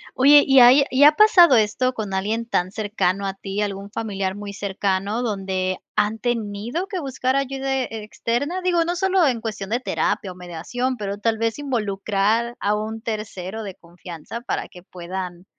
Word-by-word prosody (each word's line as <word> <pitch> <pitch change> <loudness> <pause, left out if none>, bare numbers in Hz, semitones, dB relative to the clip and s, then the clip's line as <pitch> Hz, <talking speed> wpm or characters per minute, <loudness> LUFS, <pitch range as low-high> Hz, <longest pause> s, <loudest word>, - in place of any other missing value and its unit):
Oye, 285 +2 +7
¿y 270 -1 +6
ahí 250 +3 +8
y 260 +2 +3
ha 295 - +9
pasado 355 -6 +6
esto 225 +4 +1
con 210 -5 -5
alguien 215 +4 -1
tan 185 -5 0
cercano 200 -2 -1
a 195 - -2
ti, 195 +1 -5
algún 200 -1 -4
familiar 195 -4 -3
muy 205 0 -7
cercano 200 +2 -2
donde 190 -4 -2 0.2
han 215 +1 +1
tenido 235 - -3
que 385 -3 -4
buscar 260 -3 -1
ayuda 270 0 -1
e 225 -3 -6
externa? 260 - -2
Digo, 350 -2 +2
no 350 +1 -1
solo 380 -1 +2
en 240 -4 -1
cuestión 210 -3 -5
de 235 +3 0
terapia 210 -5 -1
o - - -11
mediación, 185 +9 -4
pero 200 -2 -4
tal 220 +2 0
vez 230 +3 -1
¿involucrar 215 -2 -1
a 205 +1 +1
un 220 +1 -4
tercero 215 -2 -5
de 195 -3 -7
confianza 175 +4 -10
para 240 - -3
que 180 -2 -14
puedan 180 0 -7
215 Hz, 175 wpm, -22 LUFS, 195-255 Hz, 0.2 s, ha